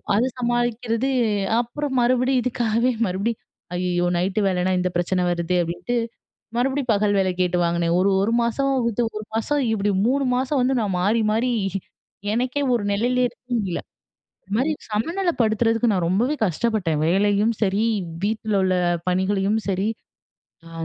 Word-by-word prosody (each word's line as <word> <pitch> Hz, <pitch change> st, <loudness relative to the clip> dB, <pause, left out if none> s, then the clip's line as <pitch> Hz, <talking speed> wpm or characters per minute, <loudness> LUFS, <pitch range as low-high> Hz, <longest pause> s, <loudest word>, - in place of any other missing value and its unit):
அத 225 Hz, -, +3 dB, 0.2 s
சமாளிக்கிறது 240 Hz, +1 st, 0 dB, 0.5 s
அப்புறம் 265 Hz, +3 st, -4 dB
மறுபடியும் 255 Hz, +1 st, +2 dB
இதுக்காகவே, 240 Hz, 0 st, +1 dB, 0.2 s
மறுபடியும் 200 Hz, +5 st, -2 dB, 0.3 s
"ஐயயோ! 175 Hz, 0 st, 0 dB
நைட்டு 190 Hz, +4 st, 0 dB
வேலைனா 185 Hz, 0 st, 0 dB
இந்த 180 Hz, 0 st, 0 dB
பிரச்சன 180 Hz, +1 st, 0 dB
வருதே!" 175 Hz, +1 st, 0 dB
அப்படின்ட்டு, 175 Hz, +8 st, -3 dB, 0.6 s
மறுபடியும் 265 Hz, -1 st, +1 dB
பகல் 205 Hz, 0 st, +2 dB
வேலை 185 Hz, -1 st, +2 dB
கேட்டு 180 Hz, 0 st, +1 dB
வாங்கினே. 170 Hz, 0 st, 0 dB
ஒரு, 195 Hz, +2 st, +3 dB
1 225 Hz, -, +1 dB
மாசம் 275 Hz, +4 st, 0 dB, 0.2 s
விட்டு, 235 Hz, +1 st, -1 dB, 0.2 s
1 215 Hz, -, -6 dB
மாசம் 285 Hz, +6 st, 0 dB
இப்படி 205 Hz, -1 st, 0 dB, 0.2 s
3 275 Hz, +1 st, +1 dB
மாசம் 265 Hz, +2 st, 0 dB
வந்து, 255 Hz, +1 st, +2 dB
நான் 195 Hz, -3 st, -1 dB
மாறி, 220 Hz, +4 st, +2 dB
மாறி 240 Hz, +3 st, +1 dB, 0.8 s
எனக்கே 255 Hz, +4 st, -1 dB
ஒரு 230 Hz, -, 0 dB
நெலையில 245 Hz, +5 st, +1 dB
இருக்க 245 Hz, -, -18 dB
முடியல. 190 Hz, -5 st, -2 dB, 0.6 s
இந்த 195 Hz, -, -28 dB
மாரி 275 Hz, +6 st, +1 dB, 0.2 s
சமநிலப்படுத்துறதுக்கு 230 Hz, -, +1 dB
நான் 180 Hz, -3 st, 0 dB
ரொம்பவே 235 Hz, -, +1 dB
கஷ்டப்பட்டேன். 180 Hz, -4 st, 0 dB
வேலையும் 205 Hz, +5 st, +2 dB
சரி, 200 Hz, +2 st, +2 dB, 0.4 s
வீட்லலுள்ள 205 Hz, -3 st, 0 dB, 0.3 s
பணிகளையும் 195 Hz, +3 st, +1 dB
சரி. 195 Hz, +2 st, 0 dB, 0.8 s
ஆ -, -, -12 dB
220 Hz, 140 wpm, -23 LUFS, 190-245 Hz, 0.8 s, அத